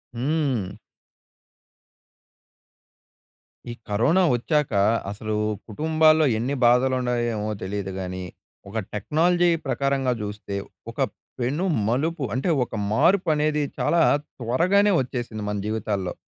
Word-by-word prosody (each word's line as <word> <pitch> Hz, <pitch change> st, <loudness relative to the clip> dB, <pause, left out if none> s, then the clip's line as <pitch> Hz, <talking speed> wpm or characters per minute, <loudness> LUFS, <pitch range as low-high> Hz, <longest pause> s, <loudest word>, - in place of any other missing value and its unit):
హ్మ్. 130 Hz, -, -1 dB, 2.9 s
ఈ -, -, -5 dB, 0.2 s
కరోనా 145 Hz, -, +3 dB
వచ్చాక 150 Hz, +1 st, 0 dB, 0.4 s
అసలు 105 Hz, +1 st, -4 dB, 0.3 s
కుటుంబాల్లో 155 Hz, +5 st, +3 dB
ఎన్ని 130 Hz, +5 st, -1 dB
బాధలుండాయో 125 Hz, -1 st, +2 dB
ఏమో 105 Hz, 0 st, -3 dB
తెలీదు 95 Hz, 0 st, -4 dB
గాని. 95 Hz, 0 st, -5 dB, 0.5 s
ఒక 110 Hz, +3 st, -2 dB
టెక్నాలజీ 170 Hz, -, +2 dB, 0.2 s
ప్రకారంగా 135 Hz, -2 st, 0 dB
చూస్తే 105 Hz, -1 st, -5 dB, 0.4 s
ఒక -, -, -14 dB, 0.4 s
పెను 140 Hz, +10 st, -1 dB, 0.2 s
మలుపు, 150 Hz, +6 st, 0 dB
అంటే 130 Hz, +8 st, -1 dB
ఒక 120 Hz, -, -7 dB, 0.2 s
మార్పనేది 155 Hz, -, +2 dB, 0.2 s
చాలా 170 Hz, -1 st, +2 dB, 0.4 s
త్వరగానే 180 Hz, -, +3 dB
వచ్చేసింది 120 Hz, -4 st, -5 dB
మన 105 Hz, -, -2 dB
జీవితాల్లో. 105 Hz, -4 st, -2 dB
125 Hz, 95 wpm, -24 LUFS, 110-155 Hz, 2.9 s, కరోనా